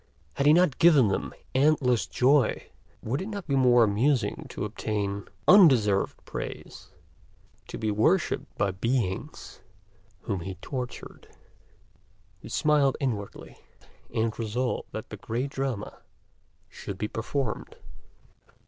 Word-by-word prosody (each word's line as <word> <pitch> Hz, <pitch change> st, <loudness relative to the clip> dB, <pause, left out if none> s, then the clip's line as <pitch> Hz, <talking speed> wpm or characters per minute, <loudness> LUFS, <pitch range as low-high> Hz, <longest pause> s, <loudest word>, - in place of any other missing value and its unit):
Had 140 Hz, -, 0 dB
he 150 Hz, -, +7 dB
not 170 Hz, -5 st, +3 dB
given 150 Hz, -10 st, +6 dB
them 95 Hz, -, -2 dB, 0.2 s
endless 130 Hz, -4 st, +2 dB
joy? 135 Hz, +2 st, +2 dB, 0.3 s
Would 130 Hz, +8 st, -2 dB
it 190 Hz, -, -5 dB
not 200 Hz, -4 st, -6 dB
be 140 Hz, -, 0 dB
more 125 Hz, -2 st, +5 dB
amusing 110 Hz, +1 st, 0 dB
to -, -, -4 dB
obtain 100 Hz, -2 st, -3 dB, 0.2 s
undeserved 130 Hz, -, +5 dB
praise, -, -, -7 dB, 0.8 s
to -, -, -7 dB
be 110 Hz, -1 st, -1 dB
worshiped 160 Hz, -, 0 dB
by 100 Hz, -, +1 dB
beings 100 Hz, -1 st, -3 dB, 0.6 s
whom 100 Hz, -2 st, -3 dB
he 95 Hz, +2 st, -6 dB
tortured? 125 Hz, +6 st, -7 dB, 1.1 s
He -, -, -11 dB
smiled 150 Hz, -3 st, +2 dB
inwardly, 110 Hz, -8 st, -5 dB, 0.5 s
and 110 Hz, 0 st, -1 dB
resolved 120 Hz, +3 st, -2 dB
that -, -, -7 dB
the -, -, -6 dB
great 125 Hz, +5 st, -3 dB
drama 135 Hz, -7 st, -4 dB, 0.7 s
should 100 Hz, -, -8 dB
be 105 Hz, -, -2 dB
performed. 115 Hz, +2 st, -4 dB
125 Hz, 120 wpm, -27 LUFS, 105-140 Hz, 1.1 s, he